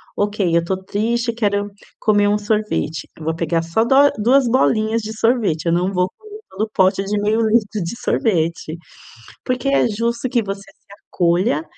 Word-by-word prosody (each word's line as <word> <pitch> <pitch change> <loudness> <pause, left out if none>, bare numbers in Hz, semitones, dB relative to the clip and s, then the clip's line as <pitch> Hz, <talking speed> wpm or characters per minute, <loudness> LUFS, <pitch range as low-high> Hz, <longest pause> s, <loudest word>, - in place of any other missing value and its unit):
"Ok, 205 -4 0
eu 170 - +1
tô 185 +2 -2
triste, 230 +4 -1
quero 205 -2 -1 0.3
comer 205 -1 +3
um 205 +1 +2
sorvete". 210 -6 -2
Eu 160 - -10
vou 160 0 -1
pegar 165 0 0
só 165 +7 +1
dó 275 +4 +5
duas 250 +4 +3
bolinhas 230 -2 +2
de 215 0 -7
sorvete. 220 -10 +1
Eu 165 - +2
não 180 +2 +1
vou 180 0 +1
comer 425 0 -12
todo 210 +3 -3
pote 190 +1 +3
de 205 +1 -1
meio 215 +2 +1
litro 215 -2 +1
de 170 +7 -5
sorvete, 165 -5 -1 0.7
porque 255 +2 -1
é 275 -3 +3
justo 235 +3 -2
que 240 -2 +1
você 195 -1 -5
se - - -32 0.2
acolha, 170 -2 +1
210 Hz, 180 wpm, -19 LUFS, 180-230 Hz, 0.7 s, dó